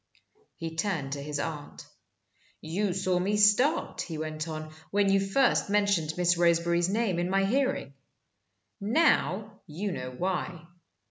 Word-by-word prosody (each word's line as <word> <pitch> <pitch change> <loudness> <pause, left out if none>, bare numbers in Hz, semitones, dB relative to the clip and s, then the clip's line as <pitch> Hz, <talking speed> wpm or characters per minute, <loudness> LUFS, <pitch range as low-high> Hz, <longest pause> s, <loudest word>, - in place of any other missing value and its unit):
He 165 -1 -6
turned 165 -8 -1
to 140 0 -4
his 145 0 -4
aunt. 150 -2 -6 0.7
"You 185 +5 -1
saw 185 0 0
me 200 +3 0
start," 210 +10 +3
he 165 -3 -5
went 155 0 -4
on, 155 -1 -6 0.2
"when 200 -1 +2
you 195 - +4
first 195 +5 +2
mentioned 200 -6 +1
Miss 175 -1 +2
Roseberry's 170 0 +3
name 205 -4 0
in 175 +1 -1
my 195 +1 +2
hearing. 255 - 0 0.9
Now 215 - +1
you 190 +7 -4
know 130 -6 -5
why." 175 +3 -3
180 Hz, 140 wpm, -28 LUFS, 160-205 Hz, 0.9 s, you